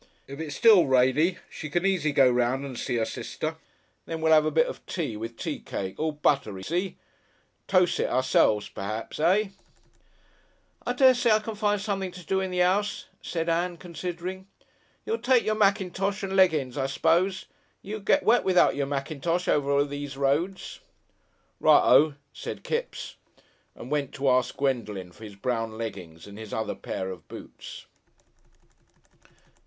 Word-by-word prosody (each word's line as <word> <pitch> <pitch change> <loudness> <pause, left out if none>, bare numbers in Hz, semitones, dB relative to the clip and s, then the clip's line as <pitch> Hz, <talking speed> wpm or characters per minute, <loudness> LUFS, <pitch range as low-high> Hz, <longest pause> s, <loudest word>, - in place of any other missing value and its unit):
If 140 +2 -9
it's 155 -3 -5
still 210 -2 +6
rainy, 130 +7 +3
she 155 - -8
can 175 +5 0
easy 180 -6 +1
go 135 -2 +5
'round 125 +2 +1
and 135 -2 -7
see 120 - -2
'er 115 - +1
sister. 155 +7 -5 0.5
Then 165 -1 -4
we'll 160 0 +3
'ave 155 0 +5
a - - +3
bit 160 +1 +3
of - - -7
tea, 150 -11 -3
with 115 +2 -6
tea - - -4
cake 95 -1 -6
all 155 0 0
buttery, 135 -10 0
see? 180 - -2 0.7
Toce 185 -2 +3
it - - 0
ourselves, 125 -4 +2
p'raps. 110 +7 -6
Eh?" 190 +6 +3 1.4
"I 245 - +1
dessay 250 -2 +4
I 215 - +6
can 220 +1 -5
find 210 -1 0
something 195 -2 -2
to 180 -2 -11
do 190 +4 0
in 190 0 -2
the 180 -1 +2
'ouse," 200 +3 0
said 165 -1 -3
Ann, 170 +1 0
considering. 180 +2 -6 0.6
"You'll 225 - -1
take 245 +1 +3
your 215 - +1
mackintosh 195 -1 0
and 195 0 -3
leggin's, 155 -8 +3
I 135 - 0
s'pose. 170 +7 +1 0.4
You'll 215 +2 -5
get 245 +8 +2
wet 240 +2 +4
without 185 -1 +4
your 140 -1 -1
mackintosh 155 +5 -2
over 140 -1 +2
those 145 -1 -6
roads." 150 +8 -1 0.8
"Righ - - +6
O," 150 -1 +5 0.2
said - - -7
Kipps, 485 +1 -4 0.6
and 125 - -10
went 145 -3 -1
to 135 -1 +2
ask 125 0 +1
Gwendolen 110 -9 -2
for 110 +5 -12
his 105 -2 -10
brown 115 0 -2
leggings 95 -8 -7
and 100 +1 -11
his 110 -2 -6
other 110 - -2
pair 95 0 -5
of 90 -4 -11
boots. - - -10
155 Hz, 165 wpm, -26 LUFS, 130-190 Hz, 1.4 s, still